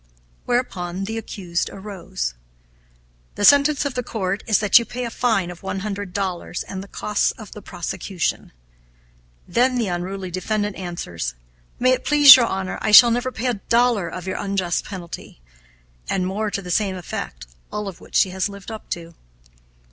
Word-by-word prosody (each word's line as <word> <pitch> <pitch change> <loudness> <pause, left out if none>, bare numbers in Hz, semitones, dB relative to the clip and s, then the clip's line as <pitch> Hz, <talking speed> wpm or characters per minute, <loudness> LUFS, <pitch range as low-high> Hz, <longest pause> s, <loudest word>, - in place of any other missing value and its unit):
Whereupon 190 -7 -1
the 220 +3 -3
accused 180 -6 -3
arose. 190 - -5 1.0
"The 205 - +1
sentence 285 +2 +5
of 285 - -2
the 250 - -1
court 195 -4 -3
is 215 - +4
that 210 +2 +6
you - - -2
pay 245 +1 -5
a 235 - -4
fine 220 -8 +1
of 175 - -12
one 195 0 -4
hundred 200 -2 -4
dollars 185 -2 -3
and 190 -1 -6
the - - -12
costs 210 +1 0
of 215 -3 -12
the 210 - -9
prosecution." 185 0 -3 1.0
Then 250 +1 +2
the 225 -5 0
unruly 185 +1 -4
defendant 205 +3 -2
answers: 85 - -5 0.4
"May 255 +1 +3
it 255 - +1
please 290 -2 +10
your 240 -3 +3
Honor, 190 -2 -3
I - - 0
shall 235 +3 +9
never 245 +2 0
pay 250 - -5
a 250 - +2 0.2
dollar 235 -6 +3
of 180 -1 -7
your 190 - -3
unjust 195 -3 -1
penalty," 175 - -8 0.7
and 185 -2 0
more 205 +3 -1
to 200 -1 -4
the 180 - -6
same 195 +1 +1
effect, 65 - -6 0.3
all 210 -1 -3
of 190 -3 -8
which - - -12
she 185 - +4
has 190 +2 -1
lived 200 +2 -9
up 220 - -9
to. 170 -1 -5
200 Hz, 180 wpm, -22 LUFS, 180-225 Hz, 1.0 s, please